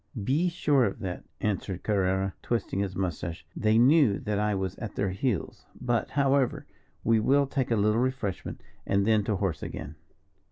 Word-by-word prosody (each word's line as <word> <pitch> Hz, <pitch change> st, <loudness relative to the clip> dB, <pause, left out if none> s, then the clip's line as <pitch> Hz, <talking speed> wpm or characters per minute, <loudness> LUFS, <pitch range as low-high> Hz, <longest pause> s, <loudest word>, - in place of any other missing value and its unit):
"Be 155 Hz, -, +2 dB
sure 145 Hz, -6 st, +2 dB
of 100 Hz, -, -2 dB
that," 90 Hz, -3 st, -5 dB, 0.2 s
answered 100 Hz, -3 st, -2 dB
Carrerra, 95 Hz, -2 st, +1 dB
twisting 115 Hz, -5 st, -2 dB
his 100 Hz, -2 st, -2 dB
moustache; 85 Hz, -2 st, -3 dB
"they 110 Hz, 0 st, +2 dB
knew 130 Hz, -3 st, +5 dB
that 105 Hz, -1 st, -1 dB
I 105 Hz, -1 st, +1 dB
was 95 Hz, -1 st, -2 dB
at 115 Hz, -4 st, -6 dB
their 100 Hz, -2 st, 0 dB
heels. 100 Hz, +1 st, -2 dB
But, 120 Hz, -2 st, 0 dB
however, 140 Hz, -2 st, +1 dB, 0.4 s
we 115 Hz, 0 st, +3 dB
will 140 Hz, +5 st, +3 dB
take 135 Hz, -1 st, -2 dB
a 115 Hz, -, +2 dB
little 105 Hz, +2 st, +2 dB
refreshment, 130 Hz, -7 st, -3 dB, 0.2 s
and 100 Hz, 0 st, +1 dB
then 110 Hz, -1 st, +3 dB
to 105 Hz, -, 0 dB
horse 95 Hz, -6 st, -2 dB
again." 75 Hz, -, -6 dB
105 Hz, 170 wpm, -28 LUFS, 95-125 Hz, 0.4 s, knew